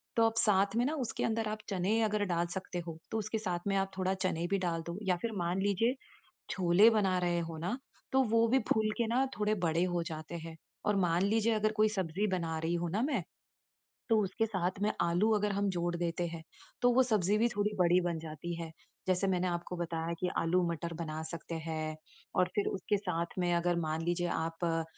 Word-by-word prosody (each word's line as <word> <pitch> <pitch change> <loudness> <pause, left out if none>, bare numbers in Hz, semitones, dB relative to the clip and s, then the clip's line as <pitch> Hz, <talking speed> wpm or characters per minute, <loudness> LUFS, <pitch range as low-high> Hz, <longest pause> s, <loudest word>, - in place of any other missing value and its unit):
तो 230 - +5
आप 225 0 +1
साथ 200 -1 +3
में 245 - +3
ना 295 - 0
उसके - - -3
अंदर 225 -1 0
आप 215 - -2
चने 195 +4 +1
अगर 210 -1 +1
डाल 175 -2 0
सकते 180 -1 -4
हो, 160 -1 -5
तो 225 - 0
उसके 215 +1 -2
साथ 180 -5 -2
में 195 - +1
आप 195 0 0
थोड़ा 190 0 +1
चने 175 -3 -1
भी 200 - +3
डाल 170 -3 -1
दो, 170 +2 -4
या 180 -1 +3
फिर 230 - 0
मान 175 +3 0
लीजिए 225 +5 +2 0.6
छोले 185 +4 +5
बना 195 -5 +2
रहे 175 -1 +1
हो 160 - -6
ना, 185 +10 -2 0.3
तो 265 0 +5
वो 230 0 +5
भी 260 +3 +4
फूल 215 -1 +1
के 235 - +2
ना 245 +4 +2
थोड़े 210 0 +2
बड़े 165 +2 +2
हो 170 - +1
जाते 160 -1 -6
हैं। 165 0 -8 0.3
और 210 -1 +3
मान 175 -2 +2
लीजिए 225 +2 +2
अगर 215 0 +1
कोई 215 0 +3
सब्ज़ी 190 -1 -1
बना 165 -4 -1
रही 165 +2 -1
हूँ 175 0 -1
ना 200 +6 0
मैं, 265 - 0 0.9
तो 225 - +5
उसके 195 +3 0
साथ 190 -5 -1
में 210 +1 +2
आलू 175 +6 +3
अगर 210 0 +1
हम 200 0 +1
जोड़ 175 -1 -1
देते 175 0 -1
हैं, 165 -1 -6 0.4
तो 245 0 +5
वो 260 +2 +6
सब्ज़ी 210 -4 +2
भी 230 +2 +4
थोड़ी 210 -1 0
बड़ी 180 0 +5
बन 170 -2 -1
जाती 160 +2 -6
है। 165 -1 -5 0.4
जैसे 185 +1 +2
मैंने 185 -1 +1
आपको 175 0 -3
बताया 165 -1 -2
कि 180 - 0
आलू 170 +2 +2
मटर 170 +1 -4
बना 155 -1 -4
सकते 170 0 -6
हैं। 155 -1 -3 0.4
और 180 - +4
फिर 205 - +1
उसके 200 +2 0
साथ 170 -3 -3
में 175 -1 +2
अगर 175 0 +1
मान 160 -1 -1
लीजिए 175 0 0
आप 165 +1 -2
अ, 165 -1 +1
185 Hz, 225 wpm, -32 LUFS, 170-210 Hz, 0.9 s, वो